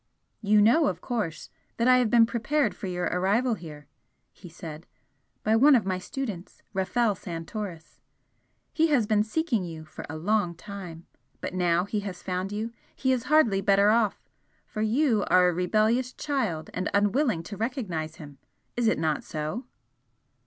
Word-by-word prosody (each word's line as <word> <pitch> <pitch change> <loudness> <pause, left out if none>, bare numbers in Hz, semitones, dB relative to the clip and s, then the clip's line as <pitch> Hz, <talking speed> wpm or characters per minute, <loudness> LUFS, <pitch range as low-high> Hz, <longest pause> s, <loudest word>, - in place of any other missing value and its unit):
"You 210 -1 +4
know, 290 +8 +5
of - - -2
course, 210 -11 -4 0.3
that 235 - +2
I 255 0 +7
have 245 -3 +2
been 230 0 +6
prepared 235 -1 0
for 195 - -6
your 180 -1 -3
arrival 205 +7 +1
here," 155 -7 -9 0.5
he 180 - -13
said 165 -1 -9 0.6
"by 215 +1 +3
one 275 +5 +7
of 230 - +2
my 185 -1 -1
students, 210 - -6
Rafel 210 +4 +1
Santoris. 170 0 -7 0.7
He 325 +1 +3
has 280 -8 +3
been 210 0 +2
seeking 230 - 0
you 160 -2 -7
for 155 - -9
a 155 - -5
long 185 0 0
time, 175 -3 -9 0.3
but - - -5
now 175 -1 +2
he 210 +1 -2
has 195 -3 -7
found 185 +1 -3
you 215 +3 -3 0.2
he 260 - +1
is 255 -2 0
hardly 245 -11 +4
better 200 +1 +4
off 220 -2 +2 0.5
for 215 - -5
you 225 0 +2
are 180 0 +5
a - - -1
rebellious 215 +8 +1
child 225 - -2
and 185 - -2
unwilling 205 - +2
to 205 - -7
recognise 195 - -3
him 145 -5 -12 0.4
is 240 -1 +1
it 225 - +3
not 155 -2 0
so?" 155 - -4
205 Hz, 165 wpm, -27 LUFS, 175-235 Hz, 0.7 s, I